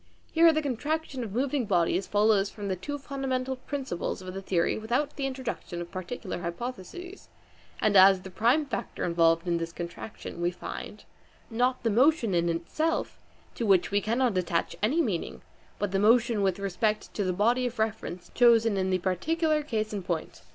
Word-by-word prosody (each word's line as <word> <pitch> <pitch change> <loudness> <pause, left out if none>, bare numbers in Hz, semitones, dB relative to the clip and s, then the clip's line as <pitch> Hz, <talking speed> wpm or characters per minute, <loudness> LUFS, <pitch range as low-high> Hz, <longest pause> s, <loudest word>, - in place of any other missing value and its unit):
Here 330 0 +6
the 310 0 0
contraction 285 +1 -2
of 215 - -6
moving 260 +3 0
bodies 180 0 +1
follows 205 -1 +3
from 205 -1 -6
the 190 - 0
two 290 +11 -5
fundamental 265 -2 -3
principles 260 - -4
of 185 -1 -8
the 195 - -5
theory, 175 -3 +1
without 245 +7 -1
the 275 -1 -1
introduction 255 -9 -5
of 175 0 -7
particular 185 0 -5
hypotheses; 245 - -7 0.5
and 210 -1 +2
as 190 0 +7
the 190 - -9
prime 240 - +2
factor 250 -7 -4
involved 165 0 +2
in 170 -1 +2
this 165 0 -4
contraction 170 +1 -7
we 175 - +2
find, 175 - -8 0.5
not 250 +3 +1
the 230 - +2
motion 250 - +3
in 170 0 +2
itself, 240 - -1 0.3
to - - -4
which 195 -4 +3
we 205 0 +2
cannot 230 -2 +1
attach 170 -2 -1
any 285 +11 +2
meaning, 190 - -3 0.3
but 205 -2 -2
the 195 - +1
motion 230 +1 +4
with 190 -2 +1
respect 200 +2 -1
to 205 - -1
the 185 - 0
body 235 +7 +2
of 245 - -7
reference 215 -5 -3
chosen 230 -3 +5
in 190 0 0
the 185 - +2
particular 305 - 0
case 220 -7 -2
in 205 - -2
point. 170 -3 -4
215 Hz, 180 wpm, -28 LUFS, 185-255 Hz, 0.5 s, as